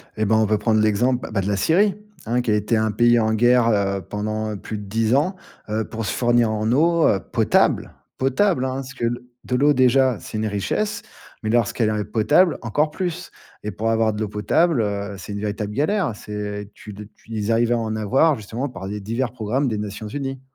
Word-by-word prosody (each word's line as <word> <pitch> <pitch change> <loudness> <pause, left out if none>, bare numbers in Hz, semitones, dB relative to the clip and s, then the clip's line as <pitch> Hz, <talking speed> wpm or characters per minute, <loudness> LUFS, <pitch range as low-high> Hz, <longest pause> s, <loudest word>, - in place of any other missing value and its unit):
Eh 110 - 0
ben, 110 +2 +3
on 110 - +3
peut 105 0 +2
prendre 110 +1 +2
l'exemple, 120 +4 +1
bah, 100 - 0
de 95 - -3
la 100 -1 0
Syrie, 190 - +3 0.3
hein, 120 +2 +1
qui 120 - -1
a - - +3
été 105 +2 +1
un 110 0 +1
pays 120 +3 +4
en 110 -1 +1
guerre, 120 +1 +4
heu, 100 -2 +1
pendant 110 +2 -3
plus 110 +2 -6
de 105 - -7
10 110 +4 +1
ans, 170 +7 +1 0.3
heu, 110 +1 0
pour 115 -1 -5
se - - -1
fournir 120 -2 +2
en 110 +1 -1
eau, 165 +4 +3
heu, 100 - +2
potable, - - +1 0.2
potable, 135 +2 +1
hein, 130 0 -2
parce 135 0 -6
que 120 - -3
le 120 +1 -3 0.2
de 125 - -2
l'eau 145 +4 +4
déjà, 130 -3 +3
c'est 110 - -7
une 110 - -1
richesse, 205 - -2 0.4
mais 110 - -3
lorsqu'elle 115 -1 +1
est 105 -1 -1
potable, 150 - +3
encore 145 +7 0
plus. 180 +1 -4 0.3
Et 105 - -3
pour 110 +2 -2
avoir 115 -1 +2
de 105 - -6
l'eau 110 - 0
potable, 120 - +1
heu, 100 -1 -3
c'est 100 - -9
une 100 - -4
véritable 105 0 -3
galère. 155 - 0
C'est 105 -1 -6
tu - - -14
l 105 +1 -9
tu 115 - -19
ils 110 -1 -2
arrivaient 115 +1 +2
à - - +1
en 110 -1 -2
avoir 135 +9 +3
justement 115 +4 -4
par 95 -8 -8
des 105 +1 -4
divers 115 +4 -2
programmes 125 +4 -1
des 110 - -2
Nations 105 +1 -5
Unies. 135 +1 -4
115 Hz, 225 wpm, -22 LUFS, 105-130 Hz, 0.4 s, pays